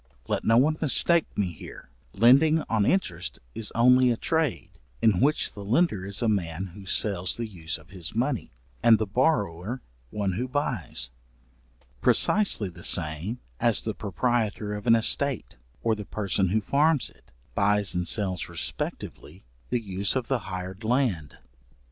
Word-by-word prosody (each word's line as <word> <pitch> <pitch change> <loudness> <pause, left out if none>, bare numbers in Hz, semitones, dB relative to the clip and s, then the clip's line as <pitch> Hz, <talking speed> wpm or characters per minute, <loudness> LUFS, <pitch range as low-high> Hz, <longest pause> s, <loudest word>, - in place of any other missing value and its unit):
Let - - -1
no 115 +1 +4
one 155 +5 +3
mistake 165 +2 +4
me 95 -4 0
here, 70 -4 -12 0.2
lending 140 - +5
on 110 -2 0
interest 90 - -1 0.2
is 110 - -3
only 125 +2 +5
a 120 - +1
trade, 160 -3 -1 0.3
in 105 -5 +3
which 150 +3 +1
the 100 - -8
lender 105 - +1
is 100 +4 -1
a - - +2
man 95 -3 -2
who 100 -1 -12
sells 95 -3 +1
the 120 - -3
use 85 -6 -4
of 80 +3 -19
his 90 -2 -4
money, 125 +1 -1 0.3
and 115 -1 +6
the 110 - -1
borrower 105 - 0 0.3
one 100 +2 -2
who 115 +8 -3
buys; 120 - -2 0.9
precisely 200 - +3
the 90 - -11
same 80 +10 -1 0.2
as - - +3
the - - -2
proprietor 110 -4 -1
of 105 +2 -6
an 115 - +7
estate, 130 +3 +1 0.3
or 115 - +2
the 105 -1 -5
person 100 -2 -1
who 110 +5 +1
farms 145 +6 +2
it, - - -27 0.2
buys 100 0 +1
and 90 -1 -1
sells 95 -5 0
respectively - - -5 0.3
the 125 - 0
use 100 0 -2
of 130 -3 -1
the 130 -2 +1
hired 95 +2 -6
land. 110 - 0
110 Hz, 160 wpm, -26 LUFS, 95-125 Hz, 0.9 s, an